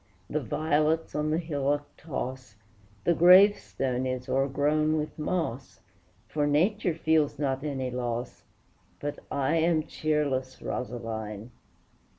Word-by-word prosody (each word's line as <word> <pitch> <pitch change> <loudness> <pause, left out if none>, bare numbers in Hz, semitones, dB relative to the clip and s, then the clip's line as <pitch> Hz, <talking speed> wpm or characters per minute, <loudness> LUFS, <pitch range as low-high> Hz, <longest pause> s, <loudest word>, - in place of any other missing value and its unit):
The - - +1
violets 155 +1 0
on 150 0 -1
the 155 - +1
hillock 145 -3 -1
toss, 130 -6 -6 0.5
The 170 - +3
gravestone 175 -8 +5
is 130 0 -3
o'ergrown 145 +4 +1
with 150 +1 -4
moss; 150 -6 -3 0.5
For 145 +5 0
nature 175 +4 +2
feels 160 -3 +2
not 135 -1 -1
any 135 -4 -2
loss, 120 -1 -4 0.6
But 145 0 -4
I 140 +4 +1
am 165 -1 +2
cheerless, 145 -5 -1
Rosaline! 115 -3 -5
145 Hz, 115 wpm, -28 LUFS, 130-155 Hz, 0.6 s, gravestone